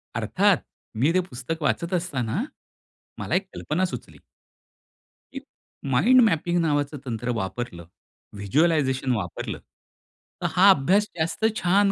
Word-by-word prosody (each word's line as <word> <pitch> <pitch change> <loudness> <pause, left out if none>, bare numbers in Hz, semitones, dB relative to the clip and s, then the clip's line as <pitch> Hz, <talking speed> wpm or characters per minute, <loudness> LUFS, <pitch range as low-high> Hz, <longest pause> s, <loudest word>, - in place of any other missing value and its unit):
अर्थात, - - +2 0.4
मी 145 +5 +4
ते 185 - +3
पुस्तक 130 +6 -5
वाचत 170 +4 -1
असताना, 145 - -2 0.8
मला - - -1
एक 190 +1 0
कल्पना 175 +5 -1
सुचली. - - -8 1.2
की 270 - -5 0.5
माइंड 245 - +5
मॅपिंग 175 0 0
नावाचं 145 -2 0
तंत्र 120 -1 -4
वापरलं, 95 -3 -5 0.5
व्हिज्युअलायझेशन 130 - +1
वापरलं, 90 -5 -4 0.8
तर - - +1
हा 190 +3 +6
अभ्यास 190 +5 +4
जास्त 165 +7 -1
छान 195 +3 +3
155 Hz, 115 wpm, -24 LUFS, 125-185 Hz, 1.2 s, हा